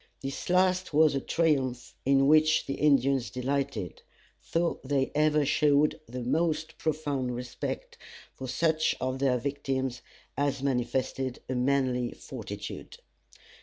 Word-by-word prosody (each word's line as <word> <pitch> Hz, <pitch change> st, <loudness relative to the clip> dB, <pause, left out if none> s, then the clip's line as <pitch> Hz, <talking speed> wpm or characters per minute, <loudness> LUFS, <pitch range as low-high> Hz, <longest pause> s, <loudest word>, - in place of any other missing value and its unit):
This 135 Hz, +4 st, -5 dB
last 185 Hz, -2 st, +2 dB
was 155 Hz, -1 st, +5 dB
a 135 Hz, -, -1 dB
triumph 135 Hz, -8 st, 0 dB
in 135 Hz, 0 st, +4 dB
which 155 Hz, +2 st, +4 dB
the 135 Hz, -, -3 dB
Indians 135 Hz, -5 st, +2 dB
delighted, 130 Hz, -, -3 dB, 0.5 s
though 170 Hz, 0 st, +1 dB
they 135 Hz, 0 st, 0 dB
ever 150 Hz, 0 st, +3 dB
showed 150 Hz, +2 st, +3 dB
the 125 Hz, +1 st, -5 dB
most 155 Hz, +4 st, 0 dB
profound 145 Hz, -5 st, -1 dB
respect 125 Hz, 0 st, -5 dB, 0.3 s
for 130 Hz, -, -7 dB
such 155 Hz, +4 st, +1 dB
of 130 Hz, +1 st, -2 dB
their 135 Hz, -2 st, +2 dB
victims 130 Hz, -1 st, -2 dB, 0.3 s
as 140 Hz, -1 st, -1 dB
manifested 130 Hz, 0 st, -1 dB
a 130 Hz, -, -2 dB
manly 125 Hz, -1 st, +1 dB
fortitude. 105 Hz, -5 st, -8 dB
135 Hz, 125 wpm, -28 LUFS, 125-150 Hz, 0.5 s, was